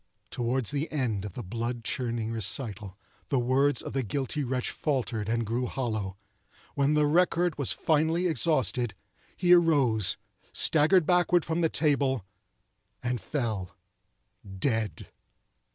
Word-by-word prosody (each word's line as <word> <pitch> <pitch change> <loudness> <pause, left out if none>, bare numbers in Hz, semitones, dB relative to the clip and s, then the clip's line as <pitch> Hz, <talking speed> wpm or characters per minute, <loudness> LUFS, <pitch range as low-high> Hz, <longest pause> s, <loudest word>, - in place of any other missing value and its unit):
Toward 125 0 -1
the 145 +6 -1
end 120 -9 -1
of 100 - -7
the - - -6
blood 115 +4 -4
chilling 115 -3 -2
recital 105 -3 -1 0.3
the 135 - +1
words 130 +4 +2
of - - -6
the 135 - 0
guilty 140 +5 -2
wretch 125 -1 -2
faltered 125 -7 -2
and 115 0 0
grew 120 +3 -1
hollow. 110 -8 -3 0.6
When 140 +1 +2
the 150 0 +3
record 175 +1 +2
was 140 - +2
finally 160 +3 +1
exhausted, 130 - +1 0.4
he 180 -1 +5
arose, 140 - +3 0.4
staggered 160 +3 +4
backward 175 0 +3
from 165 +1 -1
the 165 - +3
table, 140 - +1 0.8
and 125 -1 -2
fell—dead. 100 - -4
130 Hz, 125 wpm, -28 LUFS, 110-150 Hz, 0.8 s, he